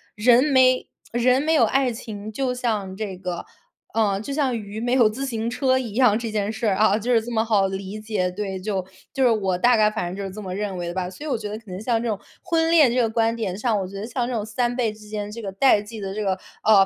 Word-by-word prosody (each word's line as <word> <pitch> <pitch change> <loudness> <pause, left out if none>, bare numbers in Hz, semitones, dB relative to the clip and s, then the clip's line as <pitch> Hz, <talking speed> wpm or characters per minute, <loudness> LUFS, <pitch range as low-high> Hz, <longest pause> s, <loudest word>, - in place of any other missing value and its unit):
人 240 +4 +5
没 260 -3 +4 0.3
人 250 +2 +3
没 315 +2 +1
有 295 - +5
爱 255 +2 +2
情， 215 -3 -7
就 260 0 -1
像 215 -6 -2
这 205 -3 -4
个， 180 -2 -5 0.5
呃， 210 -3 +2
就 275 +7 -5
像 270 -5 +1
鱼 210 0 -6
没 245 - -1
有 235 -5 +5
自 265 +6 -4
行 230 -3 -2
车 260 +1 +2
一 230 -5 -5
样， 235 -3 +4
这 230 -1 -4
件 210 -1 -1
事 220 0 -2
儿， 195 - +2
啊， 215 +1 +4
就 240 +3 0
是 225 - +4
这 240 +2 -7
么 225 0 +1
好 200 -3 +3
理 195 +2 -5
解， 215 -4 -1
对。 190 -1 -4
就， 190 -1 -2 0.3
就 270 -2 +1
是 250 - +6
我 195 -4 +1
大 240 +5 +4
概 215 0 +5
反 215 -5 -3
正 - - -6
就 200 - -4
是 195 - -4
这 215 - -6
么 185 -2 -5
认 200 -1 -3
为 175 -1 -3
的 - - -4
吧。 185 -1 -2
所 195 +11 -10
以 - - -3
我 260 - +1
觉 210 - -5
得 210 +1 -5
可 220 -4 -13
能 185 - -5
像 230 +1 0
这 235 - -1
种 205 - -2 0.2
婚 325 -1 +1
恋 305 -8 +5
这 255 - +3
个 225 - +1
观 225 0 +1
点 195 -5 -3
上， 215 -1 +1
我 190 - -3
觉 200 - -11
得 200 +2 -4
像 245 0 -2
这 255 - -3
种 215 -2 -2
3 240 +3 -1
辈 240 -3 +1
之 210 0 -14
间 210 -1 -4
这 230 - -7
个 195 -3 -5
代 210 0 +4
际 215 +1 -9
的 195 -1 -4
这 215 - -2
个， 190 -1 +1 0.3
啊， 205 -3 +6
220 Hz, 305 characters per minute, -23 LUFS, 200-245 Hz, 0.5 s, 是